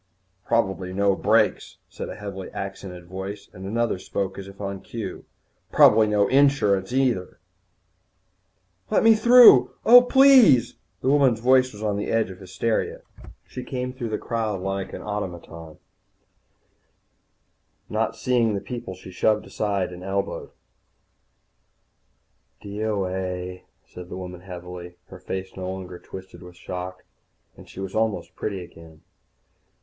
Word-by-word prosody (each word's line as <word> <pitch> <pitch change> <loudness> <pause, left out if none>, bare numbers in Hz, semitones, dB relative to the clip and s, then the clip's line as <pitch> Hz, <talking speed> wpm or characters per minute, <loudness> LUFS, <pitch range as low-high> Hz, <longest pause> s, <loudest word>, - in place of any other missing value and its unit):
"Probably 95 -5 0
no 100 0 +2
brakes," - - +1
said - - -7
a - - -7
heavily 95 -2 -7
accented 95 -2 -7
voice, 95 +3 -7
and 95 +1 -8
another 115 -2 -1
spoke 95 0 -4
as 95 - -8
if 100 0 -13
on 100 -1 -5
cue, - - -7 0.5
"Probably 110 0 +6
no 105 -1 +2
insurance, 130 -8 +3
neither." 125 -8 0 1.5
"Let - - +2
me 225 0 +7
through! 240 +3 +7
Oh, 245 +2 +10
please 250 - +6 0.2
" - - -45
The - - -3
woman's 135 -5 +3
voice 130 +1 +4
was 105 +1 -10
on 105 -2 0
the 105 - -3
edge 115 -4 +1
of 95 - -12
hysteria. 95 +4 -2 0.4
She 125 - -8
came 125 0 -4
through 125 -3 -5
the 105 - -2
crowd 110 -4 -2
like 95 0 -3
an - - -8
automaton, 85 -6 -6 2.1
not 115 +1 -1
seeing 115 -2 +1
the - - -1
people 120 -4 -7
she 95 0 -12
shoved 105 +3 +1 0.2
and 95 -4 -1
elbowed 95 +1 -3
aside. - - -28 2.1
"D.O.A.," 95 -3 -3 0.2
said 90 0 -11
the 90 - -6
woman 90 -1 -8
heavily. 90 -1 -9
Her 95 - -11
face 95 +1 -5
was - - -19
no 95 0 -4
longer 95 -1 -7
twisted 95 0 -11
with 90 -1 -12
shock, 90 +1 -7 0.5
and - - -15
she - - -11
was 95 -1 -5
almost 110 -2 -1
pretty 95 -4 -4
again. 80 -2 -15
100 Hz, 140 wpm, -24 LUFS, 95-115 Hz, 2.1 s, Oh